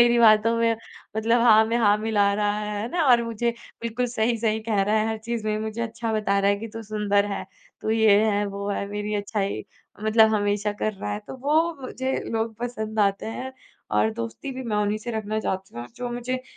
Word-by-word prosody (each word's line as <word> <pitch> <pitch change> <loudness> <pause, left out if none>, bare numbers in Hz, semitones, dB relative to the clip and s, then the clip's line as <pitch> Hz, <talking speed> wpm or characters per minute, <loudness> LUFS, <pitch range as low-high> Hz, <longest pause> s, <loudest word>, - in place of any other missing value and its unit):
मेरी 240 0 +5
बातों 225 0 +6
में 230 0 +2 0.4
मतलब 230 +2 +3
हाँ 220 -2 +7
मैं 230 - 0
हाँ 205 -2 +4
मिला 205 -2 +2
रहा 205 0 0
है, 210 -1 -3
है 230 - -3
ना? 345 -2 +1
और 240 -2 +6
मुझे 230 +1 -1 0.3
बिल्कुल 235 +2 -1
सही-सही 225 -1 0
कह 205 -3 +2
रहा 210 +2 +1
है, 215 +1 +1
हर 220 0 -2
चीज़ 225 0 -4
में 215 0 0
मुझे 220 +1 -3
अच्छा 230 0 -3
बता 210 -2 +1
रहा 200 0 +3
है 200 - +2
कि 225 +1 -6
तू 225 - -5
सुंदर 205 -1 +1
है, - - -4 0.4
तू 220 - -2
ये 220 -2 +5
है, 205 0 +1
वो 200 0 -5
है, 200 0 -2
मेरी 210 0 -3
अच्छाई 205 -1 -2 0.4
मतलब 220 0 +5
हमेशा 205 0 0
कर 215 +1 -2
रहा 105 - -5
है, 105 - -2
तो - - -6
वो 315 +5 +2
मुझे 260 +1 -3 0.2
लोग 225 0 -1
पसंद 220 -3 -4
आते 200 -1 +1
हैं 260 +1 -5 0.4
और 105 +1 +3
दोस्ती 115 - -5
भी 260 0 -6
मैं 220 -3 -2
उन्हीं 210 +1 +1
से 240 +2 -6
रखना 215 -1 -2
चाहती 190 - -4
हूँ 120 - -5
जो 245 0 -4
मुझे 255 +1 -3
220 Hz, 220 wpm, -25 LUFS, 205-230 Hz, 0.4 s, हाँ